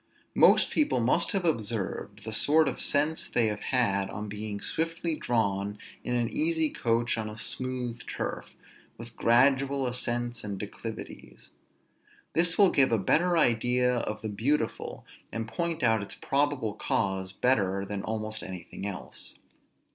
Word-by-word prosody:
Most - - +5
people 295 - +2
must 130 +9 +2
have 195 -3 -1
observed 105 - -2
the 110 0 -5
sort 155 +7 +5
of 130 - -2
sense 150 +3 +1
they 120 - +2
have 105 -1 -1
had 100 -8 +1
on 105 +1 -5
being 105 0 -5
swiftly 165 +4 -1
drawn 105 -7 -1 0.3
in 125 - -1
an 120 -1 +1
easy 160 +3 +1
coach 115 0 0
on 110 -1 -3
a 105 - -8
smooth 125 +1 -1
turf, - - -5 0.4
with 115 0 -10
gradual 135 +3 +3
ascents 120 -1 -2
and 100 -2 -4
declivities. 105 +3 -8 0.8
This 170 +1 +2
will 200 -3 +6
give 135 -3 +4
a 115 - +4
better 170 - +2
idea 125 -1 +2
of 110 -2 -3
the 110 - -2
beautiful, 115 +4 -1 0.3
and 115 -1 -4
point 165 +7 -2
out 115 -2 +3
its 100 - -6
probable 140 -6 0
cause 95 -2 -1
better, 100 -4 +1
than 100 0 -4
almost 110 0 -3
anything 95 0 -7
else. 100 -3 -8
115 Hz, 145 wpm, -28 LUFS, 105-140 Hz, 0.8 s, will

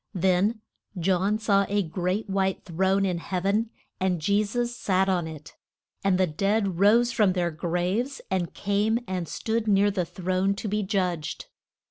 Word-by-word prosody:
Then 190 +5 +2 0.4
John 190 +4 +1
saw 200 -3 +2
a 205 0 +1
great 180 +5 -2
white 190 -1 -1
throne 190 +2 +1
in 180 -3 -1
heav 180 +1 -4
en, 215 +3 +1 0.3
and 185 -2 0
Je 200 +6 +2
sus 240 +3 -2
sat 190 -4 +1
on 180 -4 0
it. 155 -2 -10 0.5
And 195 -2 +3
the 185 - +3
dead 195 +3 0
rose 230 +5 +5
from 210 -6 +3
their 175 -2 0
graves, 180 - -1
and 180 -3 0
came 210 +3 +1
and 180 -3 -3
stood 225 +4 -2
near 205 0 +4
the 190 -2 -1
throne 185 +3 -1
to 205 - -5
be 210 +1 0
judged. 180 -6 -2
195 Hz, 165 wpm, -26 LUFS, 180-205 Hz, 0.5 s, rose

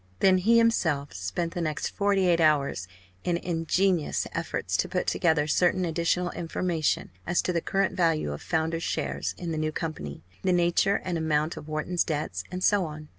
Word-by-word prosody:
Then 185 -1 +5
he 225 +5 +4
himself 160 -11 +2
spent 95 - -3
the 175 - -3
next 155 -2 -2
forty 200 -2 +1
eight 170 -1 +3
hours 140 - +2 0.4
in 175 -1 +1
ingenious 175 0 0
efforts - - -2
to - - 0
put - - -1
together 160 -3 +2
certain 180 +4 +2
additional 170 +2 0
information 170 - -1 0.2
as 175 - +1
to 180 - -1
the 170 - 0
current 195 +1 0
value 165 - +1
of 75 - -7
founders' 160 0 -1
shares - - -2
in 175 -2 -4
the 155 - -2
new 155 0 0
company, 80 - -5 0.2
the 185 - +2
nature 175 +3 +3
and 175 -3 -1
amount 155 0 0
of - - -9
Wharton's 155 +3 0
debts, 155 -1 -3
and 180 0 -5
so 205 -3 +3
on. 150 -1 -8
165 Hz, 180 wpm, -27 LUFS, 155-180 Hz, 0.4 s, Then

